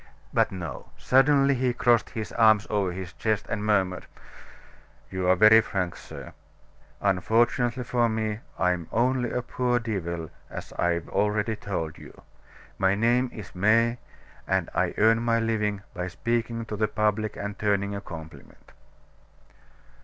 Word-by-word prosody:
But - - +2
no; 85 -8 -7
suddenly 135 +1 +4
he 125 -1 0
crossed 120 -1 +2
his 110 -3 -5
arms 110 -2 +4
over 100 -3 +1
his 90 0 -7
chest, 110 +1 -1
and 105 -1 -3
murmured: 95 -3 0 1.0
"You 95 -1 -2
are 95 - +6
very 110 +4 +7
frank, 90 -5 -3
sir. - - -10 0.7
Unfortunately 115 +6 +1
for 120 -1 +1
me, 110 -1 -2 0.2
I'm 90 -2 0
only 125 +1 +1
a 125 - -2
poor 125 0 0
devil, 85 -8 -4 0.2
as - - -8
I've 85 -1 0
already 105 +2 0
told 90 -7 -4
you. - - -14 0.6
My 95 0 +3
name 120 +4 +2
is 105 -5 -10
May, 115 +5 +3 0.5
and - - 0
I - - 0
earn 115 +1 +4
my 115 -1 +2
living 105 -3 -1
by 90 -1 -4
speaking 115 +4 -2
to 110 - -5
the 110 +1 +1
public 105 0 0
and 100 -1 -5
turning 100 -1 0
a 100 - -4
compliment." 80 -6 -11
105 Hz, 145 wpm, -26 LUFS, 95-115 Hz, 1.0 s, very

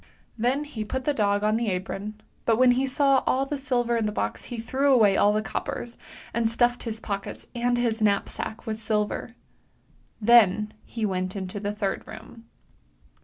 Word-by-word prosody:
" - - -35
Then 255 +6 +1
he 285 -8 -5
put 260 +4 -4
the 295 - +2
dog 205 -4 +1
on 215 +1 +2
the 235 0 -1
apron, 195 +3 -4 0.3
but 225 -1 +3
when 255 0 +6
he 260 +2 +1
saw 275 0 +3
all 265 +1 +2
the 290 - -3
silver 245 -3 0
in 225 -2 +1
the - - -1
box 105 - -3
he 240 - -6
threw 265 +5 +1
away 215 -7 +5
all 205 - +4
the 215 +1 0
coppers, 235 +2 -4 0.4
and 230 -1 +1
stuffed 240 +1 +2
his 225 -2 -4
pockets 200 -3 -5
and 245 0 +1
his 230 -2 0
knapsack 215 +2 -1
with 220 -1 -4
silver. 215 +1 -2 0.8
Then 215 -2 +5
he 225 -2 -3
w^ent 185 -1 -2
into 190 0 -4
the 205 0 -2
third 210 -2 -3
room. 225 +1 -11
225 Hz, 185 wpm, -26 LUFS, 210-245 Hz, 0.8 s, when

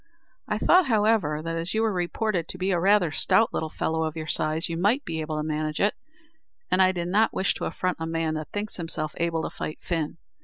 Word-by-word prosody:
I - - 0
thought, 365 -4 +5
however, 210 - +2
that 165 0 -3
as 165 +4 -2
you 220 - +2
were 220 -2 +1
reported 180 0 -1
to - - -6
be 185 +1 0
rather 185 0 +4
a - - -9
stout 225 - +3
little 160 - -2
fellow 160 +1 -1
of 160 -1 -2
your 160 -1 -4
size, 155 +1 0
you 170 - -3
might 205 +11 +1
be 160 -1 -3
able 155 0 -3
to 150 - -1
manage 155 0 -2
it, 205 - +3 0.8
and 185 +1 +4
I 185 0 +5
did 175 -2 -3
not 215 +4 +2
wish 190 - +2
to - - -4
affront 185 -1 -2
a 160 - -3
man 165 -1 -1
that 155 -1 -5
thinks 210 +1 -3
himself 160 -3 -3
able 165 -1 0
to - - -3
fight 155 - -4
Fin. 165 -2 -2
170 Hz, 235 wpm, -26 LUFS, 160-200 Hz, 0.8 s, thought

